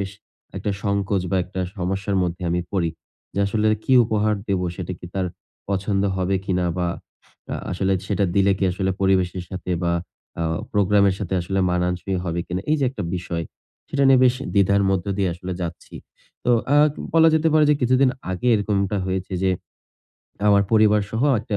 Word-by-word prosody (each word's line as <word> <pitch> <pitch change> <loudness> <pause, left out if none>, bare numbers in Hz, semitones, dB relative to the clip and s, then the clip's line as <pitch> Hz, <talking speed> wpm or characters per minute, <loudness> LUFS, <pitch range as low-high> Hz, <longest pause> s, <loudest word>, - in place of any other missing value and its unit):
বেশ 95 -1 -3 0.5
একটা 105 - -2
সংকোচ 100 -1 0
বা, 95 - +1
একটা 95 0 -5 0.2
সমস্যার 95 +2 -2
মধ্যে 90 0 -3
আমি 90 +1 +1
পড়ি। 85 -4 +1 0.4
যে - - -3
আসলে 110 +1 0 0.2
কি 130 - +1
উপহার 110 -1 +1
দেব? 95 -2 +1 0.2
সেটা 90 -1 -4
কি 85 - -9
তার 95 -1 0 0.4
পছন্দ 100 0 0
হবে 95 +1 +1
কিনা? 90 -2 0
বা, 90 -1 0 0.6
আ - - -1 0.2
আসলে 95 +1 0
সেটা 100 -1 +1
দিলে 100 0 +4
কি 95 - +1
আসলে 95 +1 -1
পরিবেশের 95 -2 +1
সাথে 90 -1 -5
বা, 85 - +1 0.5
আ - - 0 0.3
প্রোগ্রামের 100 -1 +3
সাথে 95 -1 -3
আসলে 95 +3 -2
মানানসই 90 +2 -1
হবে 85 0 -2
কিনা? 90 +1 -3
এইযে 150 -3 +2
একটা 125 -7 -5
বিষয়, 85 -1 -4 0.4
সেটা 140 -1 0
নিয়ে 130 -1 +6
বেশ 125 0 +4 0.2
দ্বিধার 100 0 +4
মধ্য 95 -1 0
দিয়ে 95 - +2
আসলে 90 +1 -6
যাচ্ছি। 85 -1 -6 0.5
তো - - +2 0.2
আ - - +6 0.4
বলা 165 0 +7
যেতে 160 +1 +3
পারে 155 -1 +5
যে - - +5
কিছুদিন 130 +2 +4 0.2
আগে 95 +7 -1
এরকমটা 100 -1 0
হয়েছে 95 0 -3
যে 95 - +3 1.0
আমার 100 -1 +5
পরিবারসহ 105 +1 +3 0.2
একটা 105 -2 -3
95 Hz, 175 wpm, -22 LUFS, 90-105 Hz, 1.0 s, বলা